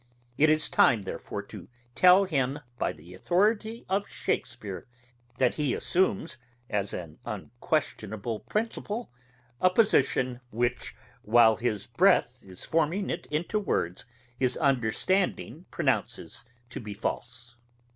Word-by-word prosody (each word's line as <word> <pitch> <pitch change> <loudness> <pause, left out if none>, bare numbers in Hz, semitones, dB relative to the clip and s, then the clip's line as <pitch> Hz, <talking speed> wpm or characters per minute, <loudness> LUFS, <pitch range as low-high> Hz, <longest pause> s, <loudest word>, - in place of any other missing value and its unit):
It 155 +4 +4
is 155 0 +3
time 110 -5 +4
therefore 95 - -5
to - - -11 0.3
tell 185 +7 +7
him 140 -6 0 0.2
by - - +1
the 85 +4 -14
authority 210 - 0
of 195 +2 0
Shakespeare, 105 -7 -4 0.5
that 125 -2 +3
he 145 -4 0
assumes, 130 - 0 0.3
as 100 -2 0
an 80 -3 -7
unquestionable 110 - -3
principle, 225 - -3 0.5
a 185 - +6
position, 135 - +2
which, 120 +2 -2 0.3
while 110 0 +5
his 110 -3 -2
breath 130 -1 +3
is 95 -2 -10
forming 165 +5 0
it 170 - -5
into 170 +8 -1
words, 90 - -2 0.3
his 130 -1 +1
understanding 145 - 0
pronounces 120 +9 -2 0.3
to - - -5
be 105 -2 -7
false. 120 +3 -5
125 Hz, 120 wpm, -28 LUFS, 110-180 Hz, 0.5 s, tell